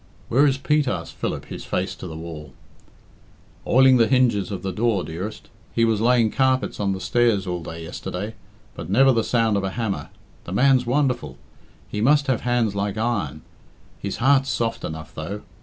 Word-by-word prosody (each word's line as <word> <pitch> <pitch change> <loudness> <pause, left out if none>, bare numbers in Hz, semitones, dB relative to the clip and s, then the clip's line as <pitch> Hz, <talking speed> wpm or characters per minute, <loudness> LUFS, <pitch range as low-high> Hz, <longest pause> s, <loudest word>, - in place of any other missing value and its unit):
"Where 140 +5 +4
is 135 -1 +1
Pete?" 150 +1 +1
asked 90 -7 -3
Philip, - - -4
his - - -8
face - - -2
to - - -7
the 80 - -7
wall. 80 -3 -8 1.1
"Oiling 130 0 +6
the 115 -2 +4
hinges 115 -6 +2
of 100 -2 -5
the 95 - -2
door, 105 -1 0
dearest. 95 +7 -6 0.3
He 115 - +4
was 110 -2 +1
laying 120 -2 +3
carpets 130 0 +1
on 100 -2 0
the 95 - -5
stairs 110 0 +2
all 90 -2 -3
day 80 0 -7
yesterday. 90 +5 -5 0.4
But - - -8
never 135 +7 +5
the 115 -3 +2
sound 115 -3 +2
of 100 - -1
a 95 - -1
hammer. 100 -7 -3 0.4
The 90 - -6
man's 130 +2 +3
wonderful. 125 - 0 0.5
He 105 - -4
must 145 +4 +4
have 130 -4 0
hands 120 -3 +1
like 100 +1 -2
iron. 100 -10 -2 0.6
His 100 - -4
heart's 135 +2 +3
soft 115 -1 -1
enough, 80 0 -6
though. 95 +7 -6
110 Hz, 185 wpm, -23 LUFS, 95-125 Hz, 1.1 s, Oiling